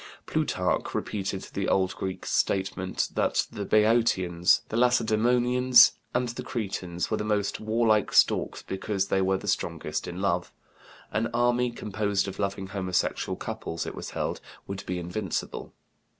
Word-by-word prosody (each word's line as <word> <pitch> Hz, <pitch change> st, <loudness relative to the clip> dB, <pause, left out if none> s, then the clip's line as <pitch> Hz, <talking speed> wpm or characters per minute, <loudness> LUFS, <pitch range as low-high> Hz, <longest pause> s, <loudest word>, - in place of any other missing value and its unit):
Plutarch -, -, -1 dB
repeated 95 Hz, -2 st, -3 dB
the 100 Hz, -, -1 dB
old 95 Hz, -1 st, +1 dB
Greek 95 Hz, -1 st, -5 dB
statement 95 Hz, -1 st, 0 dB
that -, -, +1 dB
the 100 Hz, -2 st, -5 dB
Beotians, 105 Hz, -6 st, +3 dB
the -, -, -4 dB
Lacedemonians, 125 Hz, +1 st, +5 dB, 0.2 s
and 125 Hz, 0 st, +1 dB
the 120 Hz, -, -5 dB
Cretans 95 Hz, -6 st, -3 dB
were -, -, +1 dB
the -, -, -2 dB
most 105 Hz, -2 st, 0 dB
warlike 110 Hz, -1 st, +2 dB
stocks -, -, +3 dB
because 95 Hz, 0 st, -2 dB
they 95 Hz, -, +2 dB
were 95 Hz, 0 st, +2 dB
the 105 Hz, -, -9 dB
strongest 80 Hz, -5 st, -2 dB
in 90 Hz, +1 st, -6 dB
love; 90 Hz, -2 st, 0 dB, 0.6 s
an 110 Hz, +1 st, 0 dB
army 120 Hz, +1 st, +2 dB
composed 105 Hz, -3 st, -1 dB
of 95 Hz, 0 st, -7 dB
loving 100 Hz, -1 st, -2 dB
homosexual 95 Hz, -3 st, -1 dB
couples, 85 Hz, -, -5 dB
it -, -, -5 dB
was -, -, -6 dB
held, -, -, -3 dB, 0.2 s
would 100 Hz, 0 st, -6 dB
be 90 Hz, -, -2 dB
invincible. 90 Hz, +2 st, -4 dB
100 Hz, 145 wpm, -27 LUFS, 95-115 Hz, 0.6 s, Lacedemonians